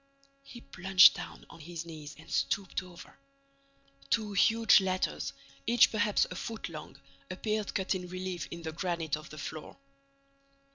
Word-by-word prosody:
He 250 -3 -12
plunged 190 -2 +6
down - - -9
on - - -13
his 165 +1 -7
knees 155 -2 -9
and - - -15
stooped 195 -2 -1
over. 180 -2 -14 0.9
Two 215 -3 0
huge 225 +1 +5
letters, 185 -1 -1 0.4
each 235 0 +6
perhaps 210 -1 +2
a - - -5
foot 225 +4 -5
long, - - -9 0.3
appeared 210 +3 -2
cut 190 0 +1
in 180 -1 -4
relief 185 0 -5
in 170 0 -8
the 160 - -4
granite 170 -3 -2
of 155 0 -10
the 155 - -10
floor. 155 0 -7
185 Hz, 150 wpm, -31 LUFS, 170-205 Hz, 0.9 s, plunged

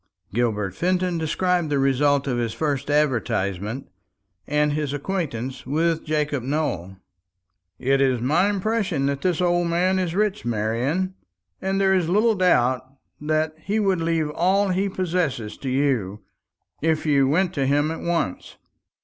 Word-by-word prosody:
Gilbert 105 -5 0
Fenton 180 - 0
described 175 +1 0
the 145 - +1
result 140 +1 +2
of 125 -3 -1
his 115 -2 -2
first 140 +1 -2
advertisement, 120 -6 0 0.6
and 150 0 +1
his 150 -2 -2
acquaintance 145 -6 -3
with 160 +3 +1
Jacob 150 -3 -1
Nowell. 115 - -2 0.8
"It 135 +4 +1
is 130 -3 +2
my 155 - +2
impression 200 -7 0
that 140 0 -1
this 180 -1 0
old 175 -1 +2
man 180 +3 +2
is 180 -2 -2
rich, 210 0 0
Marian; 120 - -1 0.5
and 195 +1 0
there 190 -1 +3
is 180 -3 +1
little 215 +5 +3
doubt 130 - +2 0.4
that 155 +1 0
he 200 +7 -1
would 195 -5 +1
leave 165 -2 0
all 190 +5 +2
he 190 +2 0
possesses 170 - -2
to 135 - -5
you, 125 -7 0 0.6
if 160 0 +1
you 140 -3 +3
went 180 +5 +1
to 135 -4 0
him 145 +3 +2
at 165 - -5
once." 170 - -2
150 Hz, 150 wpm, -23 LUFS, 135-180 Hz, 0.8 s, there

